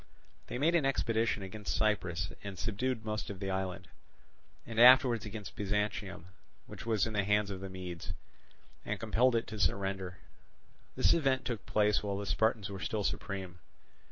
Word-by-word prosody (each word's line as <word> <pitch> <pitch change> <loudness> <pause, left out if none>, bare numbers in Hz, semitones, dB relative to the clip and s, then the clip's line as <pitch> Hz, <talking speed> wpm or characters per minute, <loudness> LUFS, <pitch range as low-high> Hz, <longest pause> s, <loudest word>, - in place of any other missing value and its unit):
They - - -4
made 155 +6 +3
an 170 -3 +3
expedition 115 -5 +1
against 100 +2 -4
Cyprus 95 -4 0
and 100 -2 -6
subdued 115 +4 -2
most 105 0 -3
of 100 -2 -6
the 95 -1 -2
island, 95 -1 -3 0.8
and 115 -1 -4
afterwards 125 -2 +7
against 105 -4 -7
Byzantium, 105 -3 -2 0.4
which - - -10
was 110 -4 +2
in 110 - -4
the 105 -2 +1
hands 105 0 +2
of 95 - -5
the 95 0 -6
Medes, 90 -2 -6 0.7
and 105 - -3
compelled 115 +3 +3
it 115 - +1
to 110 0 -7
surrender. 95 -2 -1 0.8
This - - +5
event 135 -6 +1
took 115 -6 -4
place 105 0 +3
while 100 -1 -2
the 100 - -4
Spartans 110 0 +1
were 95 - -6
still 105 +1 -2
supreme. 95 -3 -3
105 Hz, 165 wpm, -32 LUFS, 95-115 Hz, 0.8 s, afterwards